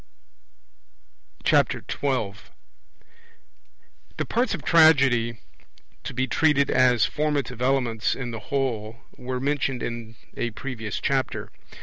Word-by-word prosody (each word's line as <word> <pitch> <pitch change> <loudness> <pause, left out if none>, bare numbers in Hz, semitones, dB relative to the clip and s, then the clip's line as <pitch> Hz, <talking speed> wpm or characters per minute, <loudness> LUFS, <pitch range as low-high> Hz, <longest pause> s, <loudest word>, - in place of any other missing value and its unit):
12 110 -7 0 1.7
The - - -1
parts 240 -2 0
of 160 - -9
Tragedy 140 -8 +5 0.7
to - - -6
be 130 +1 +1
treated 145 0 +2
as 125 -3 +4
formative 145 -5 -2
elements 125 -4 +1
in 125 -3 -5
the 115 - -5
whole 115 -6 -1 0.2
were 125 0 -4
mentioned 135 -2 -1
in 115 -1 -5 0.2
a 120 - -1
previous 115 -6 -4
Chapter. 135 -1 -1
130 Hz, 100 wpm, -25 LUFS, 115-140 Hz, 1.7 s, Tragedy